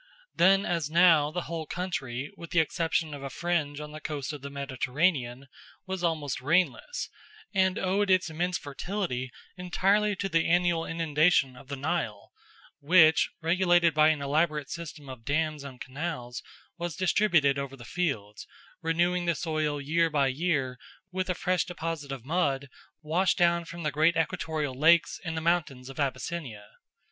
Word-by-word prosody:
Then 195 Hz, +3 st, +4 dB
as 165 Hz, -4 st, -1 dB
now 165 Hz, -3 st, +5 dB
the 175 Hz, +3 st, -3 dB
whole 160 Hz, -2 st, -5 dB
country, 140 Hz, -8 st, -4 dB
with 170 Hz, -, -10 dB
the 170 Hz, -, +2 dB
exception 160 Hz, -1 st, 0 dB
of 145 Hz, -, -7 dB
a 140 Hz, -, -5 dB
fringe 155 Hz, -3 st, -1 dB
on 150 Hz, 0 st, -7 dB
the 155 Hz, 0 st, -9 dB
coast 150 Hz, -2 st, -4 dB
of 145 Hz, -, -7 dB
the 140 Hz, -, -6 dB
Mediterranean, 135 Hz, -1 st, -1 dB, 0.4 s
was 190 Hz, -2 st, -4 dB
almost 155 Hz, -5 st, -1 dB
rainless, 175 Hz, -, 0 dB, 0.5 s
and 190 Hz, -1 st, +2 dB
owed 195 Hz, +2 st, +1 dB
its 185 Hz, -1 st, +4 dB
immense 175 Hz, +2 st, -1 dB
fertility 145 Hz, -3 st, -4 dB, 0.3 s
entirely 200 Hz, +3 st, +1 dB
to 195 Hz, -, -2 dB
the 165 Hz, -3 st, +1 dB
annual 175 Hz, -1 st, +2 dB
inundation 155 Hz, -4 st, +2 dB
of 130 Hz, -, -14 dB
the 140 Hz, -, -4 dB
Nile, 140 Hz, -7 st, -3 dB, 0.5 s
which, 160 Hz, 0 st, +5 dB
regulated 175 Hz, -1 st, +3 dB
by 155 Hz, 0 st, +5 dB
an 150 Hz, -2 st, 0 dB
elaborate 150 Hz, 0 st, 0 dB
system 160 Hz, -4 st, -7 dB
of 130 Hz, -3 st, -9 dB
dams 155 Hz, +1 st, -1 dB
and 130 Hz, -3 st, -9 dB
canals, 135 Hz, -3 st, -5 dB, 0.4 s
was 170 Hz, -2 st, -3 dB
distributed 175 Hz, -7 st, +3 dB
over 135 Hz, -1 st, -5 dB
the 120 Hz, -, -11 dB
fields, 115 Hz, -, -3 dB, 0.3 s
renewing 175 Hz, +2 st, +1 dB
the 170 Hz, -1 st, +1 dB
soil 155 Hz, -3 st, -1 dB
year 165 Hz, +4 st, +1 dB
by 140 Hz, -3 st, +2 dB
year 135 Hz, -4 st, -1 dB, 0.3 s
with 185 Hz, 0 st, -2 dB
a 180 Hz, -, +1 dB
fresh 180 Hz, 0 st, +1 dB
deposit 165 Hz, -5 st, -5 dB
of 130 Hz, -3 st, -6 dB
mud 140 Hz, -4 st, 0 dB, 0.3 s
washed 165 Hz, +4 st, +1 dB
down 170 Hz, -1 st, +3 dB
from 170 Hz, +1 st, -8 dB
the 150 Hz, -, 0 dB
great 155 Hz, +4 st, +3 dB
equatorial 155 Hz, -3 st, -1 dB
lakes 165 Hz, +5 st, +4 dB
and 160 Hz, -2 st, -4 dB
the -, -, -1 dB
mountains 155 Hz, -6 st, 0 dB
of 135 Hz, -, -10 dB
Abyssinia. 135 Hz, -5 st, -3 dB
160 Hz, 160 wpm, -28 LUFS, 140-175 Hz, 0.5 s, now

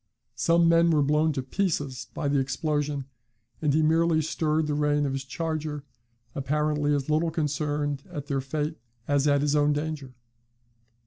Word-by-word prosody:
Some 170 Hz, +7 st, +3 dB
men 170 Hz, 0 st, +5 dB
were 155 Hz, -3 st, +3 dB
blown 150 Hz, +2 st, +2 dB
to 135 Hz, -2 st, -3 dB
pieces 140 Hz, -5 st, -2 dB
by 145 Hz, -, -2 dB
the 140 Hz, 0 st, +2 dB
explosion, 145 Hz, +1 st, -1 dB, 0.6 s
and 150 Hz, -2 st, +2 dB
he 155 Hz, +2 st, +3 dB
merely 160 Hz, +1 st, +3 dB
stirred 155 Hz, 0 st, 0 dB
the 150 Hz, -, -1 dB
rein 145 Hz, 0 st, +1 dB
of 135 Hz, -, -1 dB
his 135 Hz, 0 st, -3 dB
charger, 155 Hz, 0 st, -3 dB, 0.5 s
apparently 150 Hz, +1 st, 0 dB
as 140 Hz, -2 st, -2 dB
little 155 Hz, +2 st, +2 dB
concerned 145 Hz, -2 st, -1 dB
at 145 Hz, -5 st, -5 dB
their 140 Hz, -2 st, -1 dB
fate 150 Hz, +3 st, -3 dB, 0.3 s
as 145 Hz, 0 st, +2 dB
at 145 Hz, -1 st, +3 dB
his 145 Hz, 0 st, +1 dB
own 145 Hz, 0 st, +3 dB
danger. 145 Hz, -3 st, -4 dB
150 Hz, 165 wpm, -27 LUFS, 140-155 Hz, 0.6 s, men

